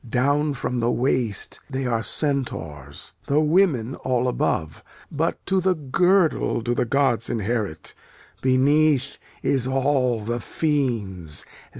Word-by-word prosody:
Down 145 +4 +1
from 125 -1 -2
the 115 0 +1
waist 120 -3 0
they 135 -1 -3
are 115 -2 0
Centaurs, 80 - -2
Though 150 +2 +3
women 150 - +2
all 125 -1 0
above. 80 -10 -1 0.3
But 160 +2 -2
to 190 0 +1
the 185 0 +2
girdle 170 +1 +2
do 120 +2 -1
the 120 - 0
gods 125 -2 +1
inherit, 110 -5 -2 0.5
Beneath 140 +2 +2 0.2
is 130 -2 +1
all 130 -4 +1
the 120 +2 -2
fiend's. 110 - -2
130 Hz, 120 wpm, -23 LUFS, 115-145 Hz, 0.5 s, Though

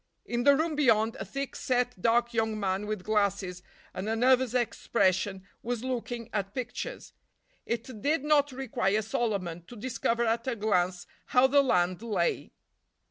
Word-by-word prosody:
In 240 0 -2
the 285 0 +7
room 315 +2 0
beyond, 230 -6 +3
a - - -4
thick 275 0 -5
set, 245 -5 -1
dark 235 +2 +2
young 220 -1 0
man 195 +1 -1
with 215 -3 -3
glasses 200 -4 0 0.3
and 190 +3 -4
a 225 - +1
nervous 255 +1 +3
expression 195 -5 0 0.2
was 240 0 -3
looking 240 -2 -3
at 200 -1 -2
pictures. 275 - -5 0.5
It 235 -1 -4
did 295 +2 +1
not 295 -1 +3
require 240 -6 0
a 215 - 0
Solomon 195 -7 -2
to 245 - -11
discover 235 0 -1
at 230 +2 0
a 255 - 0
glance 185 -4 0 0.2
how 250 +1 +5
the 280 +2 +5
land 180 -7 +1
lay. 235 - -1
230 Hz, 160 wpm, -29 LUFS, 205-255 Hz, 0.5 s, the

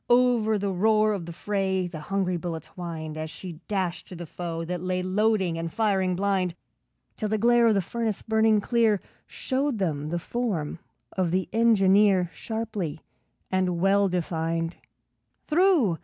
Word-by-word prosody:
Over 240 -3 +4
the 200 -1 -1
roar 215 +3 +3
of 180 -5 -5
the - - -5
fray 190 +1 -1
The 170 -3 -6
hungry 185 +3 -1
bullets 165 -2 -4
whined, 160 -3 -6
As 155 0 -4
she 165 0 -9
dashed 190 -4 -2
through 180 - -9
the 175 - -6
foe 165 0 -5
that 175 0 -4
lay 185 0 -1
Loading 190 -3 +1
and 165 0 -4
firing 190 -4 +1
blind, 190 -2 0 0.6
Till 215 - -2
the 215 - +1
glare 235 +2 +4
of 220 - +4
the 195 - +1
furnace 225 +1 -3
burning 220 -1 +3
clear 225 -2 +2 0.3
Showed 270 -1 -1
them 155 -6 -2
the 175 - -1
form 175 -7 -3 0.3
of 185 -3 0
the 185 +2 0
engineer, 200 -5 +4
Sharply 220 -8 -4 0.5
and 185 -2 +1
well 195 +2 +3
defined. 165 -1 -2 0.7
Through! 305 - +3
190 Hz, 155 wpm, -26 LUFS, 175-220 Hz, 0.7 s, Over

